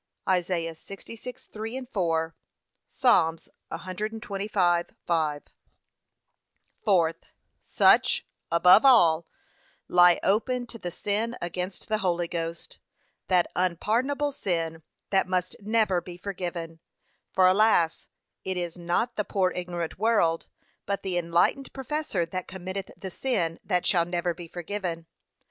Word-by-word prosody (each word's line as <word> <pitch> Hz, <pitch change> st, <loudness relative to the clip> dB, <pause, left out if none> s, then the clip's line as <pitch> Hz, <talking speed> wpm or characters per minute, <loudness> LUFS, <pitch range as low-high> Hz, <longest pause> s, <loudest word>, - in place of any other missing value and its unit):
(Isa. 175 Hz, -2 st, 0 dB
66:3, 230 Hz, +6 st, -8 dB
4; 165 Hz, -4 st, 0 dB, 0.5 s
Psa. 165 Hz, -10 st, +3 dB, 0.4 s
125:5) 180 Hz, -5 st, -1 dB, 1.4 s
Fourth, 170 Hz, -5 st, +2 dB, 0.4 s
Such, -, -, +4 dB, 0.3 s
above 180 Hz, +4 st, +7 dB
all, 170 Hz, -12 st, +5 dB, 0.6 s
lie 175 Hz, -1 st, +6 dB
open 245 Hz, +5 st, +1 dB
to 230 Hz, -1 st, -9 dB
the 180 Hz, -, -4 dB
sin 215 Hz, +6 st, -2 dB
against 180 Hz, +2 st, -4 dB
the 215 Hz, -1 st, 0 dB
Holy 175 Hz, -3 st, 0 dB
Ghost, 165 Hz, 0 st, -5 dB, 0.5 s
that 180 Hz, -2 st, +2 dB
unpardonable 235 Hz, -, 0 dB
sin, 165 Hz, -, -2 dB, 0.3 s
that 195 Hz, -2 st, +3 dB
must 185 Hz, -1 st, -1 dB
never 210 Hz, -3 st, +1 dB
be 175 Hz, -1 st, -10 dB
forgiven. 175 Hz, -3 st, -5 dB, 0.5 s
For 185 Hz, -, +4 dB
alas, 185 Hz, -3 st, +3 dB, 0.3 s
it 185 Hz, -1 st, -2 dB
is 175 Hz, 0 st, -4 dB
not 175 Hz, +8 st, -1 dB
the 210 Hz, -, +1 dB
poor 190 Hz, -2 st, +1 dB
ignorant 175 Hz, -1 st, -4 dB
world, 205 Hz, -7 st, +2 dB, 0.4 s
but 200 Hz, 0 st, -2 dB
the 185 Hz, -2 st, 0 dB
enlightened 175 Hz, +11 st, +1 dB
professor 270 Hz, -, -2 dB
that 185 Hz, +2 st, -5 dB
committeth 190 Hz, +1 st, -5 dB
the 190 Hz, -, -7 dB
sin 175 Hz, -9 st, -1 dB
that 180 Hz, -2 st, 0 dB
shall 170 Hz, -4 st, +3 dB
never 175 Hz, 0 st, -1 dB
be 170 Hz, 0 st, -10 dB
forgiven. 175 Hz, -1 st, -4 dB
185 Hz, 115 wpm, -27 LUFS, 170-210 Hz, 1.4 s, above